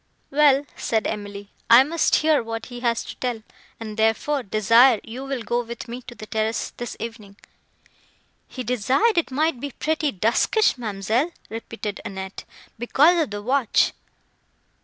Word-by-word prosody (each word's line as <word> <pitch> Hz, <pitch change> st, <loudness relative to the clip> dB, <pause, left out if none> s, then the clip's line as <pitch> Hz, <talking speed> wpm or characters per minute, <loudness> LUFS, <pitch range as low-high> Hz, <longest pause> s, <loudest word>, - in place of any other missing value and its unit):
"Well," 285 Hz, -1 st, +4 dB
said 220 Hz, -2 st, -1 dB
Emily, 205 Hz, -1 st, -5 dB, 0.2 s
"I 235 Hz, +3 st, +9 dB
must 330 Hz, +4 st, +1 dB
hear 310 Hz, -1 st, +3 dB
what 225 Hz, -1 st, -5 dB
he 245 Hz, -, -6 dB
has 235 Hz, -1 st, 0 dB
to -, -, -9 dB
tell; 240 Hz, -3 st, -3 dB, 0.4 s
and, 215 Hz, -1 st, -7 dB
therefore, 225 Hz, +6 st, +1 dB
desire 230 Hz, +3 st, +4 dB
you 240 Hz, +4 st, -7 dB
will 270 Hz, -3 st, -4 dB
go 240 Hz, +1 st, 0 dB
with 235 Hz, +1 st, -8 dB
me 240 Hz, +2 st, -6 dB
to 240 Hz, -, -9 dB
the 215 Hz, -, -9 dB
terrace, 220 Hz, +1 st, -2 dB
this 240 Hz, -1 st, -6 dB
evening." 220 Hz, -3 st, -8 dB, 1.1 s
"He 255 Hz, -, -6 dB
desired 255 Hz, -, +2 dB
it 335 Hz, -, -3 dB
might 295 Hz, 0 st, 0 dB
be 285 Hz, -, -4 dB
pretty 310 Hz, +2 st, -1 dB
duskyish, 235 Hz, -, +2 dB
ma'amselle," 225 Hz, -, -1 dB, 0.2 s
repeated 225 Hz, -2 st, -6 dB
Annette, 190 Hz, 0 st, -7 dB, 0.3 s
"because 305 Hz, +8 st, +4 dB
of 310 Hz, -, -1 dB
the 205 Hz, 0 st, -6 dB
watch." 255 Hz, -1 st, +2 dB
235 Hz, 155 wpm, -23 LUFS, 220-275 Hz, 1.1 s, I